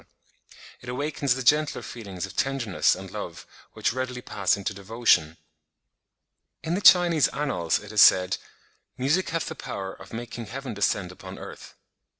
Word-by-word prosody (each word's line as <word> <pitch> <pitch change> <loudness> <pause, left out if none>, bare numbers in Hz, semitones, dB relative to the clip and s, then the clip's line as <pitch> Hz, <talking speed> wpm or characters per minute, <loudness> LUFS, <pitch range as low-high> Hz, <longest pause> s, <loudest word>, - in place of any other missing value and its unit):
It 125 - -9
awakens 140 0 -1
the 130 - -4
gentler 150 +4 +2
feelings 100 -6 -6
of 95 0 -12
tenderness 130 -8 +1
and - - -9
love, - - -7 0.3
which - - 0
readily 125 -1 -4
pass 100 0 0
into 100 +1 -3
devotion. 100 -6 +1 1.3
In 160 - -2
the 190 - -1
Chinese 175 -5 +6
annals 135 - -1
it 105 0 -10
is 105 -2 +4
said, 90 0 +6 0.6
"Music 150 +9 +1
hath 165 0 -1
the - - -5
power 95 -1 -6
of - - -14
making 120 0 -6
heaven 130 +2 -6
descend 100 -2 0
upon 90 - -10
earth." - - -10
120 Hz, 155 wpm, -26 LUFS, 100-140 Hz, 1.3 s, Chinese